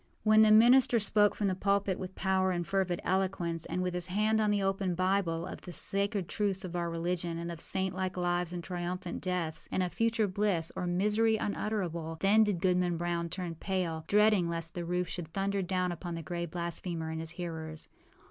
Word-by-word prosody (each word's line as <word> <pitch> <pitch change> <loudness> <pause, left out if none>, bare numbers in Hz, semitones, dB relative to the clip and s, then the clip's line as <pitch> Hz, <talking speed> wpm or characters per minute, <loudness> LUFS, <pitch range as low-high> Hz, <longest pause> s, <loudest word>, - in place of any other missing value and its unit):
When 215 0 +6
the 215 - +6
minister 240 +3 +6
spoke 210 -1 +3
from 210 - -1
the 190 - +2
pulpit 200 0 0
with 185 0 -6
power 190 -1 +1
and 175 -2 -1
fervid 190 -2 0
eloquence, 180 -3 -1
and, 180 - -2
with 180 -1 -1
his 180 0 0
hand 215 +4 +2
on 210 - +2
the 205 -1 +1
open 195 -2 0
Bible, 185 -2 0
of - - -8
the 180 - -9
sacred 200 0 0
truths 200 -3 -1
of 180 -1 -6
our 170 -1 -1
religion, 170 0 -2
and 170 +1 -4
of 165 -1 -7
saint 190 -1 0
like 185 0 -3
lives 175 -1 0
and 175 -1 -5
triumphant 175 0 -4
deaths, 180 -4 -3
and 185 - +1
of 180 - -3
future 225 -1 +1
bliss 185 -4 0
or 180 - -2
misery 210 +5 +2
unutterable, 175 -7 -3
then 210 +3 +5
did 200 -5 -1
Goodman 180 -2 +2
Brown 170 0 -2
turn 175 0 -4
pale, 165 -2 -2
dreading 210 -4 +4
lest 165 0 -4
the 175 -1 -4
roof 180 +1 -1
should 165 -2 -6
thunder 195 0 0
down 185 -1 -1
upon 175 0 -5
the 165 - -5
gray 170 0 -3
blasphemer 170 -1 -4
and 160 - -4
his 160 0 -4
hearers. 160 -3 -6
180 Hz, 205 wpm, -31 LUFS, 170-200 Hz, -, When